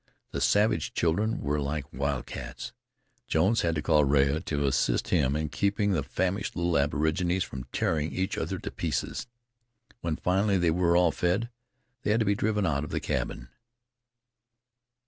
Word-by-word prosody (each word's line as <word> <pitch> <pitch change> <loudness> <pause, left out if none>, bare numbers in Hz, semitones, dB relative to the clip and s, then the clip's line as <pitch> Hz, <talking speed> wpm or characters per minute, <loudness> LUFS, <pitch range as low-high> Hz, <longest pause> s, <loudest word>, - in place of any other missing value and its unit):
The - - -3
savage 105 -6 +2
children 105 +7 +1
were 75 +1 0
like 70 0 -3
wildcats. 70 -2 -4 0.5
Jones 95 +8 +2
had 85 -1 0
to 75 - -2
call 75 -2 +4
in 70 - +1
Rea 70 +1 +3
to 70 -4 -2
assist 65 -3 +1
him 65 +3 +2
in 75 0 -1
keeping 100 +3 +1
the 85 -6 +1
famished 95 +8 -2
little 85 0 0
aborigines 80 +6 +1
from 65 -1 -7
tearing 75 +4 -1
each 95 0 -1
other - - -2
to - - -6
pieces. - - -3 0.7
When 85 -6 -2
finally 95 +4 +1
they 85 -2 +2
were 85 0 +3
all 90 -2 +4
fed, 100 +10 0 0.5
they - - -2
had 110 +2 +3
to - - +2
be 100 - +3
driven 105 0 0
out 70 -4 0
of 75 - -6
the - - -1
cabin. - - -3
85 Hz, 165 wpm, -28 LUFS, 75-95 Hz, 0.7 s, call